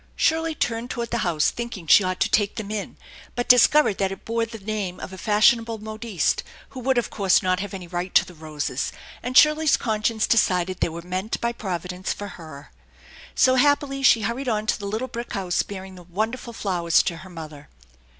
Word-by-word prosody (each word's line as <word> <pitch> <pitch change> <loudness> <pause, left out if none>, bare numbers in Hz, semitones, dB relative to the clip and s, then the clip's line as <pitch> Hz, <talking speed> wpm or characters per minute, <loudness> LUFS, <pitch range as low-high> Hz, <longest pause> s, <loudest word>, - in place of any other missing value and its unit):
Shirley 325 0 +1
turned 230 -1 -2
toward 235 -2 -4
the 235 - 0
house, 165 -6 +1
thinking 235 -7 -6
she 200 - +6
ought 185 0 -2
to - - +4
take 205 -1 +2
them 210 -2 -5
in, 210 -2 -5 0.4
but 245 - -2
discovered 250 -2 +5
that 195 -1 +1
it 195 - -9
bore 230 0 -1
the 225 0 -8
name 205 -3 -4
of 190 - -8
a - - -6
fashionable 225 +3 +3
modiste, 215 -3 -2 0.3
who 260 - -9
would, 260 +1 +1
of 240 - 0
course, 195 -3 +3
not 185 0 +1
have 200 0 -4
any 185 -2 -7
right 175 +1 -4
to - - +6
the 180 - -12
roses, 155 -2 -4 0.3
and 255 +1 0
Shirley's 305 0 +5
conscience 220 0 0
decided 185 -4 +1
they - - +1
were 170 +1 -8
meant 185 +4 -3
by 235 - 0
Providence 180 -4 -4
for 205 0 -7
her. 155 -6 -11 0.6
So, 260 - +5
happily, 275 +1 +2
she 240 -4 +5
hurried 235 +5 -2
on 215 -1 -1
to - - 0
the 200 - -5
little 220 +5 -3
brick 235 -1 -6
house, 185 -3 0
bearing 190 -1 -8
the 180 - -12
wonderful 220 +8 -3
flowers 175 -6 +1
to 170 - -3
her 190 - -11
mother. 155 -4 -10
210 Hz, 205 wpm, -24 LUFS, 180-235 Hz, 0.6 s, she